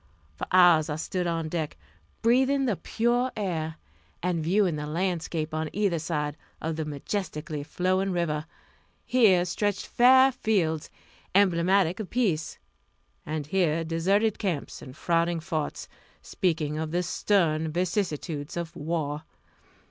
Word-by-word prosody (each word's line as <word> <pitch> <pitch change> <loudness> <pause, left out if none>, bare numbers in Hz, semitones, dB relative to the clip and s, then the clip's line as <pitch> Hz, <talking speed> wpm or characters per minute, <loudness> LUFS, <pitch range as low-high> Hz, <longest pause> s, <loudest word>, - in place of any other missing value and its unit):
For - - -5
hours 175 -4 +6
I 150 - -1
stood 175 +3 -2
on 165 -1 -1
deck, 155 - -3 0.5
breathing 265 +4 +3
the 225 -6 +1
pure 240 +6 0
air, 160 -6 -2 0.5
and 175 -3 0
viewing 180 0 +2
the 150 0 -4
landscape 165 -1 -2
on 155 0 -2
either 195 -5 +1
side 150 -2 -2 0.2
of 160 0 -3
the 160 0 -3
majestically 150 0 -4
flowing 185 +5 0
river. 160 -3 -1 0.6
Here 200 -8 +4
stretched 200 +2 -1
fair 260 +2 +6
fields, 185 - 0 0.5
emblematic 185 0 +3
of 215 - -5
peace 195 -11 0 0.7
and 155 -1 -3
here 165 -1 +1
deserted 195 +7 +1
camps 180 -9 -3
and 130 +2 -11
frowning 170 0 +1
forts, 160 -3 -3 0.4
speaking 155 -4 -1
of 160 0 -2
the 175 +3 0
stern 165 -4 +1
vicissitudes 170 -4 -2
of 170 -1 -4
war. 150 -1 -2
170 Hz, 130 wpm, -27 LUFS, 155-195 Hz, 0.7 s, hours